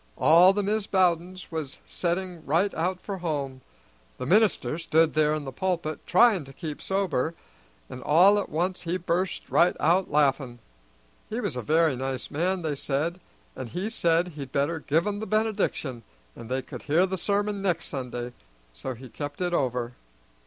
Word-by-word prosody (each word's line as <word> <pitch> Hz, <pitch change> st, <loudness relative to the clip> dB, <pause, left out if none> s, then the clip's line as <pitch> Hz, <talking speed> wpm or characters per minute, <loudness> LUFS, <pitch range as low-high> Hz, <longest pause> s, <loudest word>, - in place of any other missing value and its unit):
All 170 Hz, +4 st, +7 dB
the 205 Hz, +1 st, -1 dB
Mis' 210 Hz, +1 st, 0 dB
Bowdens 185 Hz, -1 st, 0 dB
was 155 Hz, -4 st, -4 dB
setting 175 Hz, -1 st, -3 dB
right 170 Hz, +8 st, +1 dB
out 180 Hz, +3 st, -1 dB
for 195 Hz, -1 st, -6 dB
home; 140 Hz, -6 st, -3 dB, 0.6 s
the -, -, -5 dB
minister 195 Hz, -, +2 dB
stood 160 Hz, -1 st, +3 dB
there 155 Hz, 0 st, +3 dB
in 150 Hz, -2 st, -5 dB
the 135 Hz, -, -5 dB
pulpit 170 Hz, 0 st, -2 dB
tryin' 195 Hz, -2 st, +5 dB
to 135 Hz, -, -13 dB
keep 155 Hz, 0 st, -6 dB
sober, 175 Hz, -6 st, -1 dB, 0.5 s
an' 125 Hz, -, -8 dB
all 185 Hz, +10 st, +5 dB
at 205 Hz, -, -4 dB
once 180 Hz, +4 st, -1 dB
he 175 Hz, +1 st, -1 dB
burst 185 Hz, +1 st, -2 dB
right 175 Hz, +1 st, +3 dB
out 180 Hz, +4 st, +2 dB
laughin'. 135 Hz, -4 st, +1 dB, 0.7 s
He 225 Hz, -, -3 dB
was 200 Hz, -, -2 dB
a 125 Hz, -, -3 dB
very 155 Hz, +2 st, +2 dB
nice 130 Hz, 0 st, -4 dB
man, 175 Hz, +4 st, 0 dB
they 155 Hz, -2 st, -1 dB
said, 150 Hz, +5 st, -2 dB, 0.4 s
and 120 Hz, -, -6 dB
he 190 Hz, -, -3 dB
said 170 Hz, -4 st, +2 dB
he'd 140 Hz, -5 st, -8 dB
better 145 Hz, +4 st, 0 dB
give 160 Hz, +3 st, +1 dB
'em 205 Hz, -1 st, -2 dB
the 220 Hz, -, -5 dB
benediction, 215 Hz, -, -1 dB, 0.3 s
and 115 Hz, -, -10 dB
they 130 Hz, +1 st, -1 dB
could -, -, -9 dB
hear 160 Hz, +5 st, +3 dB
the 190 Hz, 0 st, -2 dB
sermon 205 Hz, +1 st, 0 dB
next 180 Hz, -4 st, 0 dB
Sunday, 125 Hz, -3 st, -5 dB, 0.4 s
so 120 Hz, -, -5 dB
he 130 Hz, +3 st, -11 dB
kept 145 Hz, +4 st, -7 dB
it 180 Hz, -1 st, -1 dB
over. 125 Hz, -5 st, -1 dB
165 Hz, 175 wpm, -26 LUFS, 140-185 Hz, 0.7 s, All